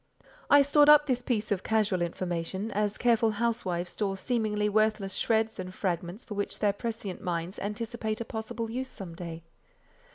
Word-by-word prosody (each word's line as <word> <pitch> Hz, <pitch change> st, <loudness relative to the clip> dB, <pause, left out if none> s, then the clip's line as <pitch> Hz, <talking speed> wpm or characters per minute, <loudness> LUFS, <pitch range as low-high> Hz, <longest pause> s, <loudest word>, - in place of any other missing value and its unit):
I 285 Hz, 0 st, +8 dB
stored 290 Hz, +1 st, +5 dB
up 300 Hz, 0 st, +8 dB
this 255 Hz, -3 st, 0 dB
piece 220 Hz, -4 st, -1 dB
of 195 Hz, -3 st, +1 dB
casual 210 Hz, -4 st, +1 dB
information, 175 Hz, +4 st, -3 dB
as 210 Hz, 0 st, 0 dB
careful 230 Hz, -2 st, +3 dB
housewives 200 Hz, -6 st, -1 dB
store 195 Hz, -2 st, -2 dB
seemingly 210 Hz, -1 st, 0 dB
worthless 215 Hz, -2 st, +1 dB
shreds 220 Hz, 0 st, +1 dB
and 185 Hz, 0 st, -5 dB
fragments 180 Hz, +2 st, -3 dB
for 220 Hz, -, -7 dB
which 205 Hz, 0 st, -3 dB
their 205 Hz, -2 st, +2 dB
prescient 215 Hz, -3 st, -5 dB
minds 175 Hz, +1 st, -3 dB
anticipate 220 Hz, +1 st, -3 dB
a 230 Hz, -, -3 dB
possible 225 Hz, +1 st, -4 dB
use 260 Hz, +2 st, -3 dB
some 185 Hz, -8 st, -7 dB
day. 165 Hz, -1 st, -7 dB
210 Hz, 165 wpm, -29 LUFS, 185-230 Hz, -, I